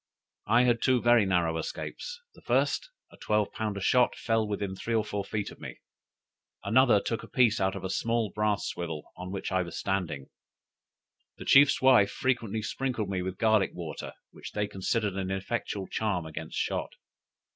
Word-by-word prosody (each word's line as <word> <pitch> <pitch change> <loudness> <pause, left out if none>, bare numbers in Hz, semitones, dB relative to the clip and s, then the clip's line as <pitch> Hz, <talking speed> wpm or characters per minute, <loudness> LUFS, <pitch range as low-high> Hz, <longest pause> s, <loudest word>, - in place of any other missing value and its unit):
I 115 +4 +5
had 120 -2 +2
two 130 -1 +3
very 120 -3 +4
narrow 85 -3 +1
escapes: - - -6
the - - -18
first, - - +1 0.2
a - - -16
twelve 105 -1 0
pounder 105 -3 -3
shot 125 +5 +3
fell 115 -1 0
within 100 -2 -3
three 115 +4 -2
or 110 -1 +1
four 105 -1 -3
feet 105 -1 -3
of - - -14
me; - - -8 0.9
another 115 +1 +5
took 115 +2 -3
a - - -11
piece 115 -4 +3
out 95 0 +1
of 95 - -6
a 95 - -3
small 115 -1 0
brass 105 -4 0
swivel 80 -3 -5
on 90 0 -7
which 100 0 -4
I 95 0 +2
was 85 -2 -6
standing. 85 -6 -3 1.1
The - - -9
chief's 135 -1 +6
wife 125 -7 +6
frequently 115 -4 -1
sprinkled 115 -4 -2
me 95 -2 -1
with 95 0 -4
garlick 110 -3 +2
water, 85 -4 -6 0.2
which - - -10
they 105 - 0
considered 100 +2 -1
an 95 -1 -3
effectual 95 +1 -3
charm 100 -6 -1
against 80 - -7
shot. - - -2
105 Hz, 180 wpm, -29 LUFS, 95-115 Hz, 1.1 s, chief's